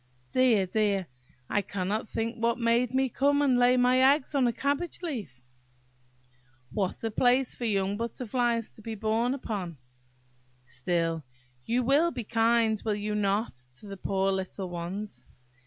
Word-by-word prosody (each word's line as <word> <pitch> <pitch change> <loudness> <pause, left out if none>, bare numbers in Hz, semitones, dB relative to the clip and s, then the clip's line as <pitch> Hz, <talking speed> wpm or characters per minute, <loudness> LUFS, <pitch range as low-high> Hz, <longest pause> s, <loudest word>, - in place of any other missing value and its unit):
Dear! 245 -7 +4
dear! 200 -1 +1 0.4
I 205 - +1
cannot 200 +3 -3
think 230 +1 -3
what 235 0 +2
made 235 0 +2
me 265 0 +3
come 285 +3 +2
and 255 -3 +3
lay 245 +1 +5
my 250 +1 +4 0.2
eggs 295 0 -7
on 270 -3 +3
a - - +2
cabbage 285 +7 -2
leaf! 210 - -5 1.3
What 195 0 -2
a 225 - -1
place 250 +3 +2
for 240 - -5
young 200 -2 0
butterflies 235 0 -1
to - - -16
be 225 +1 -5
born 225 +4 0
upon! 195 - -5 0.9
Still 165 +5 -1 0.4
you 245 +2 +1
will 285 +7 +4
be 245 -8 -5
kind, 225 0 +2
will 215 -2 0
you 210 +1 -3
not, 210 +1 0 0.2
to 140 - -11
the 200 -1 -7
poor 195 0 0
little 190 0 -4
ones? 180 +5 -6
225 Hz, 155 wpm, -28 LUFS, 195-245 Hz, 1.3 s, lay